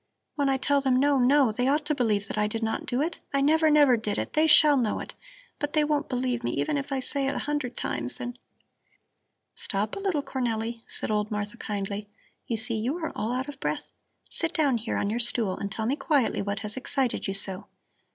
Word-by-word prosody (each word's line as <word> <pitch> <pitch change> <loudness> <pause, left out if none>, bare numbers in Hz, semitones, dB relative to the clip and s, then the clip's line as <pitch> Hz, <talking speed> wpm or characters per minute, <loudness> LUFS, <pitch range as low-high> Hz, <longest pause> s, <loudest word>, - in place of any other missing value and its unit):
"When 285 -2 +1
I 270 - +2
tell 280 +2 +2
them 265 -2 +2
no, 280 +1 +3
no, 260 -1 +4
they 245 +4 0
ought 295 +2 +2
to 300 - +1
believe 215 -7 0
that - - -5
I 210 - +2
did 225 +2 -3
not 225 - -2
do 250 +4 +1
it. 330 +2 -3 0.2
I - - +3
never, 315 +2 +4
never 290 -4 +6
did 215 -2 -2
it. - - -3
They 310 +1 +4
shall 300 -1 +8
know 235 -6 0
it! - - -7 0.5
But 290 0 -3
they 305 - +4
won't 295 0 0
believe 250 -1 -1
me - - -1
even 305 - 0
if 280 0 -3
I 270 - 0
say 275 +1 -1
it 275 - -1
a - - -3
hundred 290 -4 -2
times 120 +1 -3
and 245 0 -6 0.6
" - - -51
"Stop 205 +2 -1
a - - -4
little, 375 -8 0
Cornelli!" 230 -3 -2
said - - -2
old 210 0 0
Martha 210 0 -3
kindly. 205 -1 -4 0.4
"You 230 - -1
see, 220 0 +1
you 255 +9 -1
are 320 -3 -3
all 220 - -2
out 255 +2 -2
of 285 -2 -8
breath. - - -3 0.4
Sit 330 0 -1
down 280 -7 +2
here 225 - -3
on 200 - 0
your 235 - -1
stool 230 -5 +1
and 200 0 -5
tell 220 +2 -2
me 260 +5 +1
quietly 280 -6 +1
what 200 0 -3
has 210 0 -3
excited 260 -3 -1
you 195 - -2
so. 195 -1 -1
250 Hz, 235 wpm, -27 LUFS, 215-285 Hz, 0.6 s, shall